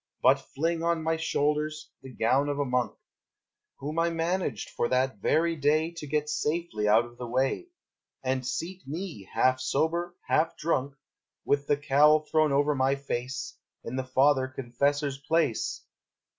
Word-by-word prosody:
but -, -, +6 dB
fling 165 Hz, +3 st, -2 dB
On 170 Hz, -1 st, 0 dB
my 160 Hz, +1 st, +1 dB
shoulders 155 Hz, -1 st, -1 dB
the 130 Hz, -1 st, -10 dB
gown 130 Hz, +5 st, +2 dB
of 145 Hz, -, -1 dB
a 145 Hz, -, 0 dB
monk 125 Hz, -1 st, -1 dB, 0.8 s
Whom 150 Hz, +4 st, -3 dB
I 170 Hz, 0 st, +3 dB
managed 165 Hz, -, -2 dB
for 120 Hz, -, 0 dB
that 130 Hz, -2 st, +1 dB
very 165 Hz, +10 st, +2 dB
day 155 Hz, +2 st, +2 dB
To 170 Hz, -3 st, -8 dB
get 150 Hz, +1 st, 0 dB
safely 150 Hz, -7 st, -1 dB
out 110 Hz, +3 st, +5 dB
of 120 Hz, 0 st, -15 dB
the 125 Hz, -, -5 dB
way 130 Hz, -, 0 dB, 0.6 s
And 130 Hz, 0 st, 0 dB
seat 180 Hz, +8 st, -4 dB
me, 155 Hz, -, -6 dB
half 130 Hz, 0 st, +3 dB
sober, 170 Hz, +6 st, 0 dB
half 165 Hz, +1 st, +1 dB
drunk, 140 Hz, -3 st, -1 dB, 0.5 s
With 140 Hz, 0 st, +1 dB
the 145 Hz, -, +3 dB
cowl 145 Hz, +2 st, +5 dB
thrown 155 Hz, -1 st, +2 dB
over 145 Hz, +2 st, +3 dB
my 135 Hz, 0 st, +2 dB
face, 135 Hz, -1 st, -4 dB, 0.2 s
In 120 Hz, -, -5 dB
the 130 Hz, -, -1 dB
father 130 Hz, +1 st, +3 dB
confessor's 135 Hz, +2 st, -1 dB
place. 165 Hz, -, 0 dB
145 Hz, 155 wpm, -28 LUFS, 130-160 Hz, 0.8 s, but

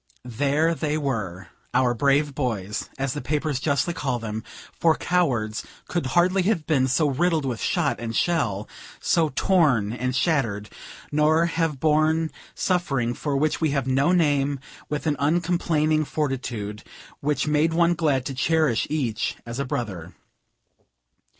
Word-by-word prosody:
There 145 Hz, +7 st, +1 dB
they 155 Hz, -2 st, -1 dB
were! 105 Hz, -, -3 dB, 0.3 s
"our 125 Hz, -2 st, +3 dB
brave 140 Hz, +3 st, +2 dB
boys," 110 Hz, -7 st, -3 dB
as 135 Hz, -2 st, -1 dB
the 145 Hz, -, -4 dB
papers 150 Hz, 0 st, -1 dB
justly 140 Hz, +4 st, 0 dB
call 135 Hz, -6 st, -1 dB
them, 110 Hz, -1 st, -5 dB, 0.4 s
for 165 Hz, -1 st, +4 dB
cowards 120 Hz, -12 st, 0 dB, 0.2 s
could 175 Hz, -7 st, -1 dB
hardly 185 Hz, +2 st, +4 dB
have 180 Hz, -5 st, 0 dB
been 135 Hz, -5 st, +2 dB
so 145 Hz, +4 st, +2 dB
riddled 155 Hz, +2 st, +1 dB
with 120 Hz, -4 st, -3 dB
shot 145 Hz, -9 st, 0 dB
and 115 Hz, -1 st, -4 dB
shell, 110 Hz, -, 0 dB, 0.3 s
so 160 Hz, -2 st, +2 dB
torn 140 Hz, -, +3 dB
and 125 Hz, +1 st, -2 dB
shattered, 120 Hz, -, 0 dB, 0.4 s
nor 155 Hz, +2 st, +3 dB
have 165 Hz, -4 st, -1 dB
borne 155 Hz, +1 st, +2 dB, 0.2 s
suffering 140 Hz, -10 st, 0 dB
for 140 Hz, +2 st, -2 dB
which 155 Hz, +3 st, 0 dB
we 160 Hz, -, +2 dB
have 135 Hz, -, 0 dB
no 135 Hz, +5 st, +2 dB
name, 145 Hz, -5 st, +2 dB, 0.3 s
with 150 Hz, +1 st, -3 dB
an 150 Hz, -2 st, +1 dB
uncomplaining 155 Hz, -1 st, +1 dB
fortitude, 120 Hz, -9 st, -3 dB, 0.4 s
which 150 Hz, 0 st, 0 dB
made 150 Hz, +2 st, +2 dB
one 170 Hz, +1 st, +3 dB
glad 150 Hz, -6 st, +1 dB
to 135 Hz, -, -3 dB
cherish 150 Hz, -2 st, +1 dB
each 130 Hz, -8 st, -1 dB
as 115 Hz, +2 st, -5 dB
a 140 Hz, -, -1 dB
brother. 105 Hz, -, -4 dB
145 Hz, 145 wpm, -24 LUFS, 125-160 Hz, 0.4 s, for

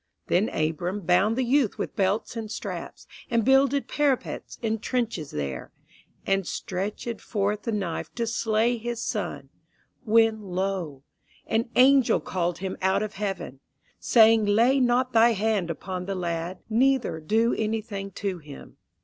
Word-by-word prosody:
Then 190 Hz, +5 st, +2 dB
Abram 170 Hz, +6 st, -2 dB
bound 190 Hz, +6 st, +2 dB
the 260 Hz, -, +2 dB
youth 255 Hz, -2 st, +2 dB
with -, -, -4 dB
belts 200 Hz, +4 st, 0 dB
and 225 Hz, -2 st, -5 dB
straps, -, -, -6 dB, 0.2 s
And 230 Hz, -3 st, +1 dB
builded 270 Hz, +1 st, +3 dB
parapets 285 Hz, -4 st, -1 dB
and 220 Hz, -1 st, -1 dB
trenches 230 Hz, -, -2 dB
there, 70 Hz, -3 st, -5 dB, 0.5 s
And 195 Hz, -2 st, +1 dB
stretch\ed 205 Hz, +4 st, -4 dB
forth 205 Hz, -1 st, -1 dB
the 230 Hz, -, -3 dB
knife 190 Hz, -6 st, -3 dB
to 235 Hz, -, -1 dB
slay 230 Hz, +1 st, +1 dB
his 240 Hz, 0 st, -4 dB
son. -, -, -4 dB, 0.5 s
When 225 Hz, -1 st, +3 dB
lo! 185 Hz, -7 st, -3 dB, 0.4 s
an 225 Hz, +2 st, 0 dB
angel 265 Hz, 0 st, +5 dB
called 175 Hz, -2 st, -2 dB
him 190 Hz, 0 st, -4 dB
out 190 Hz, +2 st, +2 dB
of 215 Hz, 0 st, -5 dB
heaven, 195 Hz, -9 st, -4 dB, 0.4 s
Saying, 225 Hz, -2 st, +5 dB
Lay 235 Hz, +6 st, +4 dB
not 250 Hz, 0 st, +2 dB
thy 230 Hz, +1 st, +6 dB
hand 210 Hz, -4 st, 0 dB
upon 180 Hz, +2 st, -5 dB
the 195 Hz, -, -2 dB
lad, 175 Hz, 0 st, -4 dB
Neither 250 Hz, -5 st, +2 dB
do 220 Hz, +9 st, +1 dB
anything 215 Hz, -2 st, -3 dB
to 195 Hz, -3 st, -3 dB
him. 150 Hz, -3 st, -12 dB
215 Hz, 145 wpm, -26 LUFS, 185-235 Hz, 0.5 s, thy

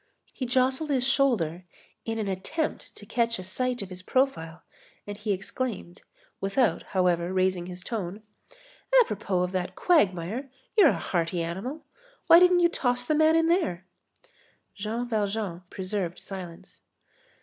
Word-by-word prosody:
He 255 Hz, -, -4 dB
jostled 260 Hz, +4 st, +1 dB
his 260 Hz, -3 st, +1 dB
shoulder 200 Hz, -, +1 dB, 0.4 s
in 225 Hz, 0 st, -2 dB
an 215 Hz, -2 st, -2 dB
attempt 195 Hz, -, -3 dB
to 205 Hz, -, -12 dB
catch 230 Hz, +1 st, 0 dB
a 185 Hz, -, -7 dB
sight 245 Hz, +5 st, -2 dB
of 190 Hz, -, -9 dB
his 185 Hz, 0 st, -8 dB
profile, 185 Hz, -9 st, -1 dB, 0.4 s
and 205 Hz, -, -6 dB
he 210 Hz, +1 st, -3 dB
exclaimed, 195 Hz, -1 st, -4 dB, 0.4 s
without, 205 Hz, +4 st, +1 dB, 0.2 s
however, 175 Hz, -1 st, +2 dB
raising 185 Hz, -1 st, +1 dB
his 180 Hz, 0 st, -8 dB
tone: 205 Hz, -1 st, -5 dB, 0.8 s
"Apropos 195 Hz, -, -1 dB
of 180 Hz, -, -2 dB
that 185 Hz, -1 st, -3 dB
quagmire, 220 Hz, -, +1 dB, 0.3 s
you're 400 Hz, -8 st, +7 dB
a -, -, 0 dB
hearty 170 Hz, -1 st, -1 dB
animal. 195 Hz, -, -5 dB, 0.4 s
Why 335 Hz, 0 st, +9 dB
didn't 360 Hz, 0 st, +5 dB
you 345 Hz, -, +5 dB
toss 245 Hz, -5 st, 0 dB
the 305 Hz, -, +1 dB
man 315 Hz, +1 st, +4 dB
in 330 Hz, 0 st, +4 dB
there?" 330 Hz, -, +1 dB, 0.9 s
Jean 225 Hz, +4 st, -3 dB
Valjean 205 Hz, -5 st, -2 dB
preserved 185 Hz, -2 st, -3 dB
silence. 180 Hz, -4 st, -9 dB
205 Hz, 145 wpm, -27 LUFS, 185-260 Hz, 0.9 s, Why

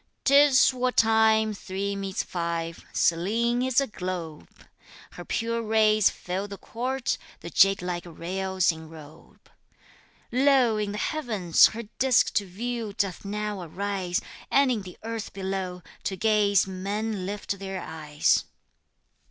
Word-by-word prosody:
'Tis 280 Hz, -1 st, +6 dB
what 250 Hz, 0 st, -1 dB
time 220 Hz, -1 st, +4 dB
three 200 Hz, 0 st, -4 dB
meets 195 Hz, -1 st, -3 dB
five, 170 Hz, -1 st, -4 dB
Selene 225 Hz, +8 st, +1 dB
is 255 Hz, -1 st, +2 dB
a 275 Hz, -, +1 dB
globe! 180 Hz, -, -6 dB, 0.6 s
Her -, -, -9 dB
pure 230 Hz, 0 st, -2 dB
rays 215 Hz, -1 st, +4 dB
fill 185 Hz, +3 st, -4 dB
the 200 Hz, -1 st, -8 dB
court, 255 Hz, +4 st, -3 dB, 0.2 s
the 170 Hz, -, -8 dB
jadelike 180 Hz, -3 st, +2 dB
rails 185 Hz, +2 st, -1 dB
enrobe! 160 Hz, -1 st, -13 dB, 0.8 s
Lo! 255 Hz, -3 st, +4 dB
in 210 Hz, -1 st, -2 dB
the -, -, -4 dB
heavens 215 Hz, -, +3 dB
her 230 Hz, +1 st, -6 dB, 0.2 s
disk 260 Hz, -2 st, +3 dB
to 205 Hz, -2 st, 0 dB
view 225 Hz, +3 st, -4 dB
doth 195 Hz, -3 st, -2 dB
now 210 Hz, -1 st, -3 dB
arise, 185 Hz, +1 st, -2 dB, 0.3 s
And 275 Hz, -1 st, +4 dB
in 225 Hz, -4 st, -1 dB
the 185 Hz, -2 st, -11 dB
earth 225 Hz, -1 st, -5 dB
below 190 Hz, -2 st, -4 dB, 0.2 s
to 190 Hz, -, -1 dB
gaze 210 Hz, -2 st, +3 dB
men 195 Hz, +1 st, -3 dB
lift 200 Hz, -1 st, -4 dB
their 195 Hz, -1 st, -5 dB
eyes. 150 Hz, -3 st, 0 dB
200 Hz, 130 wpm, -26 LUFS, 185-225 Hz, 0.8 s, Tis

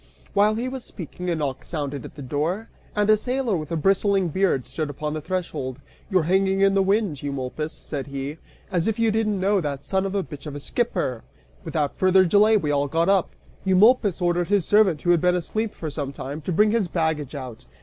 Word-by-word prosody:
While 210 Hz, +1 st, +4 dB
he 240 Hz, +3 st, -2 dB
was 260 Hz, -1 st, -5 dB
speaking, 180 Hz, 0 st, -7 dB
a 170 Hz, -, +1 dB
knock 140 Hz, -4 st, -3 dB
sounded 145 Hz, -5 st, -4 dB
at -, -, -11 dB
the 145 Hz, -, -8 dB
door, 160 Hz, -, -2 dB, 0.3 s
and 210 Hz, -1 st, +2 dB
a 215 Hz, -, +7 dB
sailor 250 Hz, 0 st, -1 dB
with 155 Hz, -1 st, -4 dB
a -, -, 0 dB
bristling 195 Hz, +2 st, +2 dB
beard 180 Hz, -7 st, +1 dB
stood 155 Hz, -2 st, -4 dB
upon 150 Hz, +1 st, -4 dB
the 155 Hz, -, -3 dB
threshold. 160 Hz, -7 st, -3 dB, 0.3 s
"You're 185 Hz, -5 st, +3 dB
hanging 190 Hz, +3 st, +2 dB
in 195 Hz, 0 st, +5 dB
the 195 Hz, -, +3 dB
wind, 195 Hz, -6 st, +1 dB
Eumolpus," 140 Hz, +2 st, -3 dB
said 145 Hz, -3 st, -6 dB
he, 140 Hz, +2 st, -5 dB, 0.3 s
"as 175 Hz, 0 st, +1 dB
if 225 Hz, -, 0 dB
you 230 Hz, -1 st, +2 dB
didn't 215 Hz, -2 st, 0 dB
know 195 Hz, +1 st, +2 dB
that 140 Hz, -3 st, -4 dB
son 190 Hz, 0 st, 0 dB
of 195 Hz, -, -4 dB
a 195 Hz, -, +1 dB
bitch 145 Hz, -2 st, -9 dB
of 145 Hz, -, -6 dB
a -, -, -5 dB
skipper!" 175 Hz, -, -2 dB, 0.4 s
Without 150 Hz, -3 st, -2 dB
further 185 Hz, 0 st, +5 dB
delay 210 Hz, +4 st, +5 dB
we 150 Hz, -7 st, -1 dB
all 145 Hz, 0 st, +1 dB
got 165 Hz, +5 st, +1 dB
up. 195 Hz, -3 st, +3 dB, 0.3 s
Eumolpus 200 Hz, 0 st, +4 dB
ordered 175 Hz, 0 st, +1 dB
his 200 Hz, -4 st, +2 dB
servant, 205 Hz, -7 st, +3 dB
who 175 Hz, -, +3 dB
had 170 Hz, -2 st, +3 dB
been 180 Hz, 0 st, +3 dB
asleep 215 Hz, +5 st, -2 dB
for 155 Hz, -2 st, -5 dB
some 140 Hz, -2 st, -4 dB
time, 140 Hz, +2 st, -6 dB
to 165 Hz, -, -4 dB
bring 210 Hz, +5 st, +4 dB
his 225 Hz, -4 st, +1 dB
baggage 160 Hz, -4 st, -1 dB
out. 125 Hz, -, -8 dB
175 Hz, 220 wpm, -24 LUFS, 150-200 Hz, 0.4 s, a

